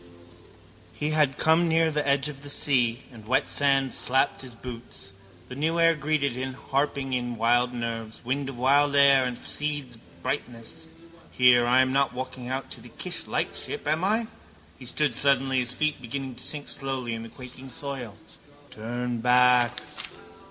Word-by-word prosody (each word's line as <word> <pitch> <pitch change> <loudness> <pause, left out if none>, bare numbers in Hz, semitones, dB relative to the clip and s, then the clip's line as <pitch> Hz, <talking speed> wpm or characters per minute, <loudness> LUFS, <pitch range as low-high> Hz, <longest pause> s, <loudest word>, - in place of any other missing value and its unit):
He 150 +1 -2
had 150 -3 +2
come 160 +2 +4
nearer 165 0 +3
the 150 -1 -1
edge 140 +1 +2
of 140 -2 -8
the 145 - -6
sea 125 -4 +1
and 110 -3 -13
wet 135 +3 +2
sand 135 -2 +1
slapped 130 +1 +1
his 130 -3 -10
boots. 115 -5 -9 0.4
The - - -9
new 160 +5 0
air 165 0 +6
greeted 150 -2 0
him, 130 +1 -4
harping 135 0 -1
in 120 -1 -2
wild 120 +2 +2
nerves, 115 -1 -5
wind 135 +2 -1
of 135 - -8
wild 140 +3 +3
air 140 -2 +6
of 125 -1 -5
seeds 145 -5 -3
of 115 - -23
brightness. 125 +2 -5 0.4
Here, 125 -1 +5
I 125 +2 +5
am 130 0 +1
not 135 -2 +2
walking 130 -1 -6
out 130 0 -4
to - - -9
the - - -12
Kish - - -4
lightship, - - -3
am 155 +3 +1
I? 220 +4 +2 0.5
He 125 - -9
stood 150 +3 +1
suddenly, 135 -1 +2
his 125 0 -2
feet 155 -3 -1
beginning 130 +2 -5
to 120 - -8
sink 145 -2 -4
slowly 135 -4 -2
in 115 - -4
the 115 - -8
quaking 130 +2 -11
soil. 130 -6 -6 0.5
Turn 120 +2 -4
back. 125 0 +4
130 Hz, 175 wpm, -26 LUFS, 120-145 Hz, 0.5 s, air